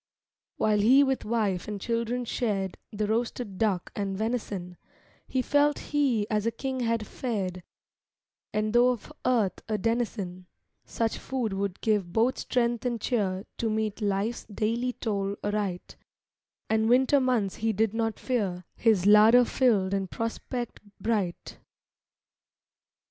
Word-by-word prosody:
While 210 Hz, -1 st, +2 dB
he 255 Hz, +7 st, +6 dB
with 265 Hz, -1 st, 0 dB
wife 210 Hz, -5 st, 0 dB
and 210 Hz, -1 st, -4 dB
children 235 Hz, +3 st, -1 dB
shared 200 Hz, -6 st, -1 dB, 0.2 s
The 210 Hz, -1 st, -1 dB
roasted 225 Hz, -2 st, -2 dB
duck 200 Hz, -6 st, 0 dB
and 195 Hz, -2 st, -2 dB
venison, 205 Hz, -6 st, -3 dB, 0.5 s
He 260 Hz, -1 st, 0 dB
felt 290 Hz, +2 st, +3 dB, 0.2 s
he 265 Hz, -8 st, +2 dB
as 215 Hz, 0 st, 0 dB
a -, -, +2 dB
king 265 Hz, +2 st, -4 dB
had 230 Hz, -2 st, 0 dB
fared; 195 Hz, -9 st, -3 dB, 0.9 s
And 215 Hz, 0 st, -1 dB
though 240 Hz, +1 st, +6 dB
of 245 Hz, +5 st, -10 dB
earth 230 Hz, -7 st, +1 dB
a 215 Hz, -, +1 dB
denizen, 205 Hz, -5 st, -2 dB, 0.4 s
Such 225 Hz, -1 st, -2 dB
food 245 Hz, -6 st, -2 dB
would 195 Hz, -1 st, -3 dB
give 205 Hz, -5 st, +1 dB
both 230 Hz, +6 st, +2 dB
strength 240 Hz, -2 st, 0 dB
and 240 Hz, -2 st, -1 dB
cheer 200 Hz, -4 st, -1 dB
To 230 Hz, -, 0 dB
meet 215 Hz, 0 st, -2 dB
lifes 205 Hz, +3 st, -1 dB
daily 230 Hz, +4 st, -1 dB
toil 200 Hz, -4 st, -2 dB
aright, 205 Hz, -3 st, -3 dB, 0.7 s
And 220 Hz, 0 st, +2 dB
winter 260 Hz, +3 st, +5 dB
months 245 Hz, -7 st, 0 dB
he 225 Hz, +1 st, +1 dB
did 220 Hz, 0 st, +1 dB
not 225 Hz, -1 st, -1 dB
fear, 195 Hz, -8 st, -2 dB
His 215 Hz, -6 st, +3 dB
larder 215 Hz, +4 st, +7 dB
filled, 210 Hz, -7 st, +2 dB
and 195 Hz, -2 st, -1 dB
prospect 230 Hz, +2 st, -4 dB, 0.2 s
bright. 200 Hz, -5 st, -2 dB
220 Hz, 140 wpm, -28 LUFS, 200-240 Hz, 0.9 s, larder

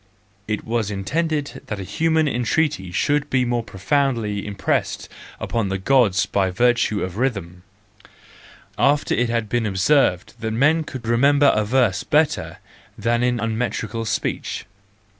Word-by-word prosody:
It 105 Hz, -1 st, -2 dB
was 115 Hz, -2 st, -1 dB
intended 145 Hz, +9 st, -2 dB
that 105 Hz, -, -4 dB
a -, -, -4 dB
human 160 Hz, -, +1 dB
entreaty 140 Hz, -, 0 dB
should 145 Hz, +9 st, 0 dB
be 130 Hz, -1 st, +2 dB
more 120 Hz, -1 st, 0 dB
profoundly 110 Hz, 0 st, -1 dB
im¬ 100 Hz, -1 st, -7 dB
pressed -, -, -1 dB, 0.3 s
upon 115 Hz, -4 st, -2 dB
the 95 Hz, -, -1 dB
Gods 100 Hz, -3 st, +3 dB
by 95 Hz, -2 st, 0 dB
virtue 120 Hz, +1 st, +1 dB
of 95 Hz, +1 st, -5 dB
rhythm, 100 Hz, -9 st, -2 dB, 1.2 s
after 145 Hz, +1 st, +2 dB
it 125 Hz, -1 st, +1 dB
had 115 Hz, -2 st, -1 dB
been 115 Hz, 0 st, 0 dB
observed 95 Hz, -, +2 dB
that 110 Hz, 0 st, -3 dB
men 150 Hz, +7 st, +3 dB
could 130 Hz, -5 st, -8 dB
remember 140 Hz, +5 st, +4 dB
a 105 Hz, -, +1 dB
verse 115 Hz, -4 st, +1 dB
better 155 Hz, 0 st, +1 dB, 0.4 s
than 120 Hz, +2 st, 0 dB
an 125 Hz, -1 st, +1 dB
unmetrical 115 Hz, 0 st, -2 dB
speech. 105 Hz, -, -3 dB
115 Hz, 140 wpm, -22 LUFS, 100-140 Hz, 1.2 s, remember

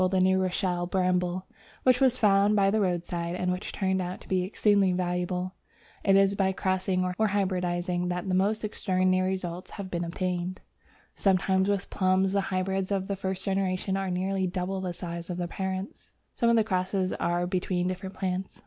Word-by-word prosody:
the 190 Hz, 0 st, +1 dB
New 190 Hz, 0 st, +4 dB
Rochelle 180 Hz, -1 st, -1 dB
Bramble, 180 Hz, 0 st, 0 dB, 0.4 s
which 255 Hz, +1 st, +4 dB
was 255 Hz, -2 st, +4 dB
found 205 Hz, -1 st, +4 dB
by 195 Hz, -1 st, +4 dB
the 215 Hz, +1 st, +2 dB
roadside, 175 Hz, -2 st, -1 dB
and 180 Hz, 0 st, 0 dB
which 180 Hz, 0 st, -4 dB
turned 190 Hz, -1 st, 0 dB
out 180 Hz, +1 st, -4 dB
to -, -, -15 dB
be 185 Hz, -1 st, +1 dB
exceedingly 200 Hz, 0 st, +2 dB
valuable. 180 Hz, +1 st, -1 dB, 0.5 s
It 195 Hz, -, +4 dB
is 195 Hz, 0 st, +5 dB
by 195 Hz, -1 st, +1 dB
crossing 185 Hz, -1 st, 0 dB
or 220 Hz, -, +4 dB
hybridizing 180 Hz, -3 st, 0 dB
that 180 Hz, +1 st, -3 dB
the 185 Hz, -, 0 dB
most 200 Hz, +4 st, +1 dB
extraordinary 185 Hz, -3 st, +1 dB
results 185 Hz, -1 st, -4 dB
have 195 Hz, -3 st, -7 dB
been 170 Hz, 0 st, -1 dB
obtained. 180 Hz, +1 st, -2 dB, 0.5 s
Sometimes 190 Hz, 0 st, +2 dB
with 200 Hz, -1 st, -1 dB
plums, 190 Hz, 0 st, +2 dB
the 200 Hz, -, +2 dB
hybrids 190 Hz, 0 st, -1 dB
of 195 Hz, -1 st, 0 dB
the 200 Hz, -, -1 dB
first 190 Hz, -1 st, -4 dB
generation 190 Hz, -1 st, 0 dB
are 195 Hz, -1 st, -1 dB
nearly 190 Hz, +1 st, 0 dB
double 185 Hz, +1 st, -2 dB
the 185 Hz, -1 st, -2 dB
size 170 Hz, 0 st, -6 dB
of 175 Hz, -, -3 dB
their 175 Hz, -, -1 dB
parents. 190 Hz, +3 st, -5 dB, 0.2 s
Some 235 Hz, -, +2 dB
of 235 Hz, -, +5 dB
the 225 Hz, -, +4 dB
crosses 185 Hz, -2 st, 0 dB
are 175 Hz, +1 st, 0 dB
between 180 Hz, 0 st, -1 dB
different 185 Hz, +1 st, -5 dB
plants. 185 Hz, 0 st, -3 dB
185 Hz, 185 wpm, -28 LUFS, 180-195 Hz, 0.5 s, is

